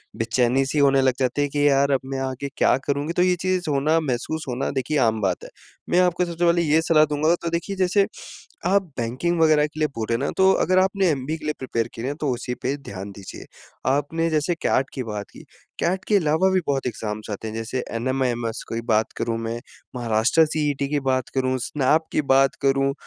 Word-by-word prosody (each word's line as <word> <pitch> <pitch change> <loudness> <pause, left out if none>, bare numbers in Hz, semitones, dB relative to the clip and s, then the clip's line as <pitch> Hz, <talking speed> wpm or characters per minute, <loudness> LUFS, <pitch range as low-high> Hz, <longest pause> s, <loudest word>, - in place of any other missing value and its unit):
बेचैनी-सी 125 +5 +1
होने 135 -1 +4
लग 130 -1 +3
जाते 130 +2 0
है 145 - +2
कि 145 +1 +2
यार, 140 0 +3
अब 135 - +3
मैं 135 0 -4
आगे 135 +1 -3
क्या - - +4
करूँगी? 145 +3 -1
तो 175 - +1
ये 180 0 +3
चीज़ 185 -2 0
होना 150 +3 +2
महसूस 155 +2 -3
होना 125 +2 -2
देखिए 140 +3 -1
आम 110 -1 0
बात 95 -3 -1
है। - - -9 0.4
मैं 175 - +3
आपको 180 0 +2
सबसे 170 0 -2
पहले 170 0 +3
ये 160 -1 +3
सलाह 160 -1 +4
दूँगा, 150 +2 +1
तो 170 - -2
देखिए 170 +4 -3
जैसे, 190 +1 +2 0.6
आप 195 +2 +3 0.2
बैंकिंग 130 +9 -1
वगैरह 155 -2 +4
के 155 +1 -9
लिए 155 - +2
बोल 110 - -2
रहे 115 - +2
ना, - - 0
तो 190 0 +5
अगर 185 -1 +2
आपने 190 0 +2
एमबीए 145 +2 -2
के 155 - -12
लिए 150 0 -1
प्रिपेयर 115 -3 -2
किया 115 +2 -5
है 140 - -1
ना, - - -8
तो 145 - 0
उसी 125 +1 -4
पे 135 +2 -1
ध्यान 100 -8 -8
दीजिए। 100 -1 -10 0.4
आपने 145 +5 +1
जैसे 155 +2 +1
कैट 135 - +2
की 130 - -3
बात 105 -2 -5
की, - - -14 0.3
कैट 185 +2 0
के 210 - +4
अलावा 165 +1 +2
भी 190 0 +2
बहुत 135 -2 -1
एग्ज़ाम्स 110 -2 -4
आते 105 +2 -5
हैं, 110 - -7
जैसे 115 +3 -3
एनमेएमस 120 -2 -1
कोई 115 - -3
बात 110 0 +2
करूँ 115 -1 -1
मैं, 115 +1 -4 0.4
महाराष्ट्र 120 +6 +3
सीईटी 145 -3 -1
की 145 0 0
बात 130 -2 0
करूँ, 130 -1 +1
स्नैप 150 +5 +1
की - - +2
बात 135 -1 +3
करूँ 135 0 +2
140 Hz, 220 wpm, -23 LUFS, 125-160 Hz, 0.6 s, तो